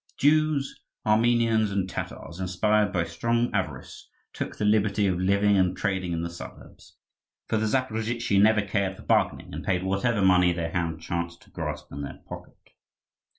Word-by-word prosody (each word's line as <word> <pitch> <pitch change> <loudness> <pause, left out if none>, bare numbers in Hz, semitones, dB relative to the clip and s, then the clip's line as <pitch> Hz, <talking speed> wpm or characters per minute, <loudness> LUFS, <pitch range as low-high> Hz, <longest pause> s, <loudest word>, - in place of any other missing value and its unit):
Jews, 150 -1 +2 0.2
Armenians, 115 0 +3
and 100 -2 -1
Tatars, 85 -2 -6
inspired 100 +3 +1
by 85 - +1
strong 115 +8 -1
avarice, - - -4 0.2
took - - -5
the 105 - -1
liberty 105 0 +2
of 90 -2 +1
living 100 +2 +3
and 95 -1 +2
trading 95 -4 -1
in 85 0 -2
the 85 - -3
suburbs; 85 - -12 0.5
for 110 - 0
the 110 0 0
Zaporozhtzi 115 -3 0
never 105 0 +4
cared 100 -1 -1
for - - -12
bargaining, - - 0
and - - -5
paid 90 -1 0
whatever 100 +3 0
money 90 -1 +5
their 85 -1 -3
hand 80 -3 -2
chanced 85 +1 -4
to - - -23
grasp - - -5
in 70 - -6
their 70 - -7
pocket. - - -11
100 Hz, 165 wpm, -26 LUFS, 90-110 Hz, 0.5 s, money